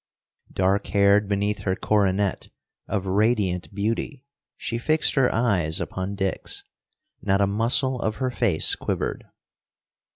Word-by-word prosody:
Dark 95 Hz, +2 st, +1 dB
haired 100 Hz, 0 st, +3 dB
beneath 100 Hz, +1 st, -1 dB
her 95 Hz, -1 st, -1 dB
coronet, 100 Hz, -2 st, 0 dB, 0.4 s
of 100 Hz, -1 st, -2 dB
radiant 95 Hz, -5 st, 0 dB
beauty, 115 Hz, +7 st, -3 dB, 0.3 s
she 115 Hz, -, -4 dB
fixed 155 Hz, +5 st, +1 dB
her 135 Hz, -3 st, +2 dB
eyes 95 Hz, -9 st, +1 dB
upon 95 Hz, +2 st, -4 dB
Dick's. 100 Hz, -, -2 dB, 0.6 s
Not 100 Hz, -1 st, +1 dB
a 100 Hz, -, +4 dB
muscle 115 Hz, +5 st, +2 dB
of 110 Hz, -1 st, -1 dB
her 130 Hz, +1 st, -2 dB
face 105 Hz, -10 st, +3 dB
quivered. -, -, -3 dB
100 Hz, 125 wpm, -24 LUFS, 95-115 Hz, 0.6 s, a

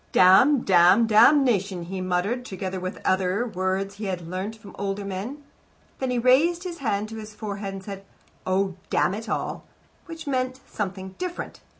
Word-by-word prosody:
"Damn, 200 Hz, +10 st, +6 dB
damn, 185 Hz, +3 st, +5 dB
damnation!" 215 Hz, -, +4 dB
he 185 Hz, +2 st, -5 dB
murmured, 185 Hz, +7 st, -1 dB
together 190 Hz, -4 st, -5 dB
with 185 Hz, +1 st, -4 dB
such -, -, -15 dB
other 185 Hz, +4 st, +1 dB
words 195 Hz, -2 st, -2 dB
as -, -, -18 dB
he 215 Hz, -, -4 dB
had 180 Hz, -3 st, -4 dB
learnt 190 Hz, +5 st, -4 dB
from 215 Hz, -2 st, -14 dB
older 200 Hz, 0 st, -3 dB
men. 205 Hz, +10 st, -5 dB, 0.6 s
Then 265 Hz, -, -1 dB
he 250 Hz, -, 0 dB
raised 290 Hz, +9 st, +3 dB
his 350 Hz, -2 st, -6 dB
hand 215 Hz, -5 st, -1 dB
to 225 Hz, -, -7 dB
his 215 Hz, -1 st, -9 dB
forehead 200 Hz, -2 st, -5 dB
and 190 Hz, -, -8 dB
said, 195 Hz, -1 st, -7 dB, 0.4 s
"Oh, 190 Hz, 0 st, 0 dB
damn -, -, +2 dB
it 220 Hz, +1 st, -6 dB
all -, -, -3 dB, 0.2 s
" -, -, -35 dB
which 330 Hz, -1 st, -8 dB
meant 255 Hz, -2 st, -1 dB
something 190 Hz, -2 st, -5 dB
different. 360 Hz, -1 st, -5 dB
200 Hz, 185 wpm, -25 LUFS, 190-245 Hz, 0.6 s, Damn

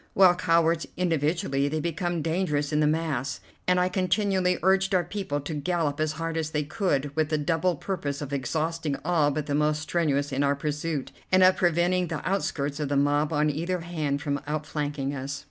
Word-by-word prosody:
While 190 Hz, -2 st, +7 dB
cowards 165 Hz, -2 st, +2 dB
individually, 155 Hz, -4 st, +1 dB
they 155 Hz, +2 st, -1 dB
become 170 Hz, 0 st, -2 dB
dangerous 160 Hz, -3 st, 0 dB
in 150 Hz, -, +2 dB
the 150 Hz, -, +3 dB
mass, 150 Hz, -4 st, -1 dB, 0.3 s
and 180 Hz, 0 st, +4 dB
I 180 Hz, -, +3 dB
continually 185 Hz, 0 st, +1 dB
urged 190 Hz, +1 st, +3 dB
our 180 Hz, -, +3 dB
people 175 Hz, -5 st, -3 dB
to 145 Hz, +3 st, -5 dB
gallop 150 Hz, -1 st, -1 dB
as 155 Hz, -1 st, 0 dB
hard 165 Hz, +1 st, -3 dB
as 160 Hz, -1 st, -1 dB
they 150 Hz, -1 st, -1 dB
could, 145 Hz, -4 st, -1 dB
with 155 Hz, -1 st, +1 dB
the 155 Hz, -, +1 dB
double 165 Hz, +4 st, +1 dB
purpose 145 Hz, -4 st, -3 dB
of 145 Hz, -1 st, -5 dB
exhausting 155 Hz, +3 st, -1 dB
all 165 Hz, -4 st, +3 dB
but 150 Hz, 0 st, -2 dB
the 145 Hz, -, -2 dB
most 150 Hz, +1 st, +1 dB
strenuous 145 Hz, -4 st, 0 dB
in 135 Hz, +1 st, 0 dB
our 140 Hz, 0 st, +2 dB
pursuit, 150 Hz, 0 st, -3 dB, 0.2 s
and 185 Hz, 0 st, +6 dB
of 185 Hz, 0 st, +6 dB
preventing 175 Hz, +1 st, +2 dB
the 160 Hz, -3 st, -4 dB
outskirts 150 Hz, -7 st, -1 dB
of 150 Hz, -2 st, -2 dB
the 145 Hz, -, +1 dB
mob 145 Hz, +2 st, +2 dB
on 150 Hz, 0 st, +2 dB
either 170 Hz, +4 st, -2 dB
hand 155 Hz, -4 st, -2 dB
from 145 Hz, -2 st, -1 dB
outflanking 145 Hz, -2 st, -2 dB
us. 140 Hz, +1 st, -4 dB
155 Hz, 195 wpm, -26 LUFS, 145-175 Hz, 0.3 s, While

